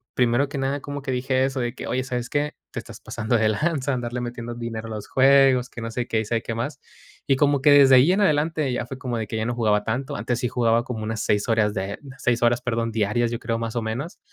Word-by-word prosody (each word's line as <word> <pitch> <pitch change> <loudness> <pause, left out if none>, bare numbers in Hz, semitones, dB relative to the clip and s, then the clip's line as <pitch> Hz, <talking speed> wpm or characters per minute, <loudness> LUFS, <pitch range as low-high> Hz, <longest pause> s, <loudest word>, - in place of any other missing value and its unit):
primero 125 +3 +2
que 140 - -5
nada 135 +1 -1
como 145 0 -6
que 135 - -3
dije 130 +1 +1
eso 135 -1 -2
de 120 0 -2
que: - - -7
"Oye, 130 0 -1
¿sabes 125 -2 -4
qué? 145 +1 -1 0.2
Te - - -4
estás - - -11
pasando 115 +1 -1
de 110 -1 +2
lanza, 140 +1 0
andarle 120 0 -3
metiendo 120 -1 -5
dinero 115 -1 -5
a - - -8
los 105 - -7
juegos", 135 -2 +4
que 120 - -9
no 115 0 -4
sé 120 +1 -3
qué, 110 - 0
y - - -5
sabe 115 +1 -1
qué 115 - -5
más. 140 +5 -4 0.5
Y 135 - +4
como 145 -1 +2
que 145 0 +5
desde 135 -2 +8
ahí 135 +8 +6
en 200 +2 +2
adelante 155 -5 +1
ya 120 - -3
fue 135 - -7
como 125 -2 -3
de 110 - -3
que 110 - -4
ya 110 - -1
no 120 0 -2
jugaba 105 -3 +2
tanto, 135 +5 -3
antes 120 -3 -2
sí 125 - 0
jugaba 120 -2 +2
como 115 -4 -5
unas 110 0 -3
6 105 +2 +1
horas 105 -2 +2
de 95 +1 -3
unas 135 -2 -12
6 120 -1 +1
horas, 120 0 +3
perdón, 115 -2 -1
diarias, 110 +2 +1
yo 120 - -3
creo, 115 0 -2
más 115 0 -4
o 120 - 0
menos. 125 +10 -4
120 Hz, 270 wpm, -24 LUFS, 115-135 Hz, 0.5 s, desde